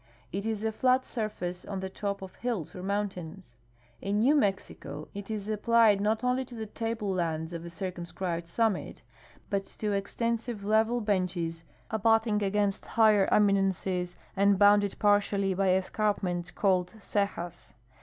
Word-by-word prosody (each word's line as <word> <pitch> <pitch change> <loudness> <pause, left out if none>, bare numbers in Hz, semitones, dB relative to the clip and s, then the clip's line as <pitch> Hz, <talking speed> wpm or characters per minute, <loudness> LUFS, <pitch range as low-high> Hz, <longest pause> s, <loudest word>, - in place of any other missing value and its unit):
It 200 +4 -3
is 220 -1 -2
a 220 - +1
flat 255 +3 +2
surface 195 -6 -4
on 195 -2 -5
the 190 - -3
top 200 +1 -4
of 190 - -10
hills 230 -10 -3
or 180 - -6
mountains. 185 - -4 0.4
In 200 +1 -1
New 265 +6 +5
Mexico 200 -10 -1
it 200 0 -7
is 210 -2 -3
applied 220 -1 +4
not 215 +3 +1
only 250 +1 +1
to 245 - -11
the 220 -1 -4
table 220 -2 -3
lands 165 -2 -2
of 170 0 -5
a 170 - -7
circumscribed 175 -1 -4
summit, 220 +2 -1 0.5
but 195 -1 0
to 210 -1 -3
ex 200 0 -3
tensive 230 -2 -1
level 220 +3 +2
benches 180 -5 -1 0.3
abutting 220 0 +2
against 200 0 0
higher 215 -3 +6
eminences 190 -3 +2 0.2
and 200 0 +4
bounded 205 0 +5
partially 205 -2 +2
by 190 +1 +1
escarpments 185 -2 0
called 185 0 +1
cejas. 200 -4 -3
200 Hz, 150 wpm, -29 LUFS, 185-220 Hz, 0.5 s, higher